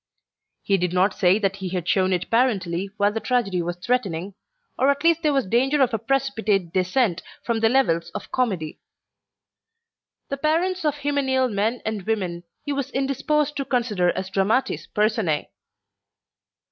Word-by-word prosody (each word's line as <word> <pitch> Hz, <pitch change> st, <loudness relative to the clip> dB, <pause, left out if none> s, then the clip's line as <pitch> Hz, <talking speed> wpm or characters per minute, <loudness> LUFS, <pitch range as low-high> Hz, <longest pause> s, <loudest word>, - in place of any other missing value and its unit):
He 195 Hz, -, +2 dB
did 180 Hz, 0 st, -1 dB
not 190 Hz, +2 st, +3 dB
say 180 Hz, +2 st, +3 dB
that 195 Hz, -2 st, -1 dB
he 190 Hz, -2 st, -4 dB
had 175 Hz, -2 st, -3 dB
shown 185 Hz, +1 st, +2 dB
it 180 Hz, 0 st, -2 dB
parentally 195 Hz, -7 st, +1 dB
while 205 Hz, 0 st, +3 dB
the 225 Hz, -, -2 dB
tragedy 220 Hz, -8 st, 0 dB
was 175 Hz, +1 st, -3 dB
threatening, 195 Hz, -4 st, -1 dB, 0.5 s
or 265 Hz, -, +4 dB
at 280 Hz, +2 st, 0 dB
least 335 Hz, 0 st, +4 dB
there 305 Hz, -2 st, +2 dB
was 275 Hz, -3 st, +1 dB
danger 260 Hz, +8 st, +2 dB
of 260 Hz, -3 st, +3 dB
a 225 Hz, -, 0 dB
precipitate 220 Hz, -8 st, 0 dB
descent 185 Hz, +1 st, +1 dB, 0.2 s
from 230 Hz, -1 st, 0 dB
the 225 Hz, 0 st, +3 dB
levels 175 Hz, -11 st, +2 dB
of -, -, -6 dB
comedy. 190 Hz, -12 st, -1 dB, 1.5 s
The 275 Hz, -, -2 dB
parents 330 Hz, +5 st, 0 dB
of 295 Hz, -2 st, +2 dB
hymeneal 265 Hz, -3 st, +1 dB
men 220 Hz, +5 st, -1 dB
and 220 Hz, -2 st, -2 dB
women 180 Hz, -4 st, -2 dB, 0.2 s
he 290 Hz, -, -1 dB
was 275 Hz, -1 st, -3 dB
indisposed 280 Hz, +3 st, 0 dB
to 275 Hz, -, -1 dB
consider 230 Hz, -9 st, +1 dB
as 190 Hz, 0 st, -4 dB
dramatis 200 Hz, +7 st, 0 dB
personae. 210 Hz, -8 st, 0 dB
220 Hz, 160 wpm, -23 LUFS, 185-270 Hz, 1.5 s, or